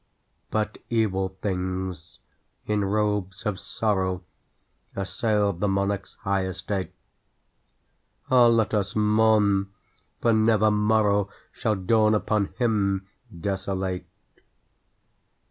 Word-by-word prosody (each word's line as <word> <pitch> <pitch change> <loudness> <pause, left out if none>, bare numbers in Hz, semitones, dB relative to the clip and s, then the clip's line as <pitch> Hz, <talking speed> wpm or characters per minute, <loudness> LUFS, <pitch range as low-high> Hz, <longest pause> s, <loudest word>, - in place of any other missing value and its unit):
But 110 0 -2
evil 95 -5 0
things, 95 -3 -3 0.5
in 105 -1 0
robes 105 -1 -1
of 105 -3 -1
sorrow, 95 -4 -1 0.7
Assailed 100 -1 0
the 105 - +1
monarch's 100 0 -1
high 95 -1 0
estate. 95 +1 -4 1.4
(Ah, 125 -2 +7
let 115 -2 +2
us 100 -2 0
mourn! 105 -2 +3 0.5
for 115 - +3
never 110 -1 +4
morrow 105 -1 +2 0.2
Shall 110 - -1
dawn 110 +3 +3
upon 105 -1 +1
him 100 -5 0 0.3
desolate 95 -1 -2
100 Hz, 95 wpm, -25 LUFS, 95-110 Hz, 1.4 s, Ah